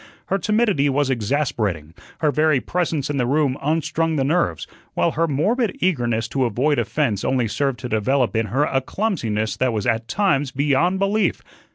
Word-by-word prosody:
Her 195 - +1
timidity 210 -8 +2
was 140 0 +1
exasperating, 105 - -1 0.3
her 150 -2 +3
very 155 -2 +2
presence 155 -3 -2
in 145 - -2
the 125 -2 +1
room 140 -1 +1
unstrung 160 +2 0
the 140 - +1
nerves, 135 - 0 0.3
while - - +2
her 165 +2 0
morbid 200 - 0
eagerness 120 -10 0
to 135 -2 0
avoid 130 +6 +1
offence 120 -10 -1
only 130 -3 +1
served 135 +4 -1
to 125 - -4
develop 120 +3 +1
in 110 0 +1
her 130 +8 +1
a 135 -2 0
clumsiness 120 - -2
that 130 -2 +1
was 105 -2 -2
at 115 -1 0
times 170 -4 +1
beyond 145 +7 +1
belief. 195 -1 0
140 Hz, 175 wpm, -21 LUFS, 120-165 Hz, 0.3 s, her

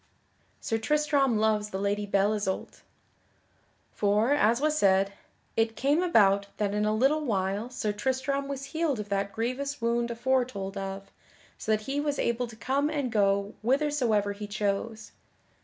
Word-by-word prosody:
[Sidenote: - - -14 0.2
Sir - - -4
Tristram 290 -5 +2
loves 215 -1 +1
the 190 - -4
Lady 205 +1 -1
Belle 200 +1 +2
Isoult] 205 -3 -3 1.1
For, 210 +6 +2
as 235 -4 +3
was 305 +1 +1
said, 195 -5 +3 0.4
it 225 0 +1
came 285 +5 +2
about 200 - +4
that 205 -1 0
in 210 0 +1
a 215 - +2
little 280 +7 +2
while 200 -1 -1
Sir 245 -4 -2
Tristram 265 +5 -1
was 275 -1 -5
healed 315 -7 0
of 210 -1 -6
that 200 0 -1
grievous 255 +6 -3
wound 235 0 0
aforetold 235 -5 -1
of 195 0 -6 0.5
so 220 - -2
that 215 0 +2
he 270 +6 -2
was 290 -1 -1
able 235 +1 0
to 230 - -12
come 275 +6 0
and 285 -5 -2
go 200 0 +1
whithersoever 245 -5 +1
he 205 +1 -7
chose. 210 +2 -3
225 Hz, 160 wpm, -28 LUFS, 205-270 Hz, 1.1 s, about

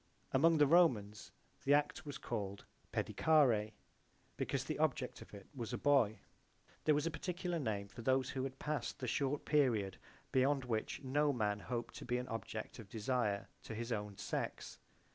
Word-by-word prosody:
Among 160 +5 +5
the 150 - +6
Romans 125 - +3 0.3
the 140 +1 +5
act 150 +3 0
was 140 -2 -4
called 100 -4 -4 0.3
Paedicare 120 -9 +3 0.6
because - - -1
the - - -3
object - - 0
of - - -12
it 100 -2 -10
was 120 -5 -5
a - - 0
boy. 135 -7 +3 0.6
There 155 - +5
was 150 +1 +1
a 165 - 0
particular 175 +1 -2
name 105 -7 -2
for 105 +4 -10
those 130 +1 +2
who 130 - -2
had 135 -1 -4
past 150 0 -2
the 130 - -4
short 140 +3 0
period 120 -10 +2 0.3
beyond 135 0 +3
which 115 +3 -2
no 145 +3 +2
man 105 -5 0
hoped 120 +3 -4
to - - -7
be 125 0 0
an 125 +1 -4
object 110 +1 -5
of 105 -4 -10
desire 110 -2 0
to 110 - -7
his 115 +2 -4
own 105 -3 -3
sex. - - -4
125 Hz, 175 wpm, -37 LUFS, 110-145 Hz, 0.6 s, the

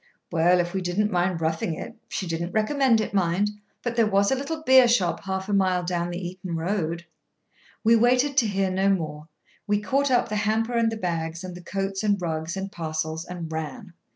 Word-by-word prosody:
"Well, 175 +2 +4
if 175 0 -1
we 190 - -1
didn't 195 +4 0
mind 175 -2 0
roughing 160 0 -1
it—she 190 - -6
did 165 -1 -3
not 170 +1 -4
recommend 240 +2 +3
it, - - -4
mind—but 205 +5 -1
there 230 -2 +4
was 200 +2 +3
a - - +3
little 315 +4 -4
beershop 245 - +5
half 190 0 -3
a 205 - -2
mile 185 -2 +2
down 175 -1 -1
the 175 - -4
Eton 180 -1 -6
road—" 170 -1 -2 0.8
We 230 +1 +6
waited 250 +4 +3
to 240 -5 +5
hear 195 -2 0
no 190 +1 +2
more; 155 -5 -2 0.4
we 205 0 +2
caught 275 +6 +1
up 245 -2 +3
the 210 - -1
hamper 220 +3 0
and 230 -1 +2
the 225 - -4
bags, 165 -2 -3
and 185 -1 -6
the 175 - -9
coats 195 +2 -3
and 205 -2 +2
rugs, 160 0 -3
and 195 0 -4
parcels, 160 -1 -3
and 170 -3 -6
ran. 170 +5 -5
190 Hz, 200 wpm, -25 LUFS, 170-215 Hz, 0.8 s, We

